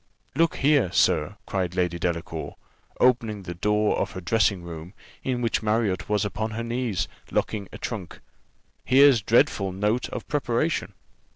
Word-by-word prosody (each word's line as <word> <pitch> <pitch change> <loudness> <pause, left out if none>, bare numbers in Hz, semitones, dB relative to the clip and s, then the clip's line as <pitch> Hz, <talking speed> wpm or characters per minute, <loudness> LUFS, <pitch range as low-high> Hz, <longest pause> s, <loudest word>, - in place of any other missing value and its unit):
"Look 165 +3 +2
here, 140 - +3
sir," 95 +1 +2
cried 90 -2 -2
Lady 90 -2 0
Delacour, 85 -1 -3 0.4
opening 115 -5 +2
the 90 - -5
door 105 +4 +1
of - - -2
her - - -5
dressing 95 -1 +1
room, 85 +2 -9 0.3
in 125 -2 -2
which 115 - +1
Marriott 105 -4 0
was 105 -1 +1
upon 105 +2 -2
her 115 - -2
knees, 115 -6 -1 0.2
locking 100 -3 -2
a - - -8
trunk, 100 -8 -6 0.6
"here's 135 -2 +6
dreadful 100 -3 +2
note 105 +6 0
of - - -6
preparation." 145 +2 -1
105 Hz, 150 wpm, -25 LUFS, 95-120 Hz, 0.6 s, here's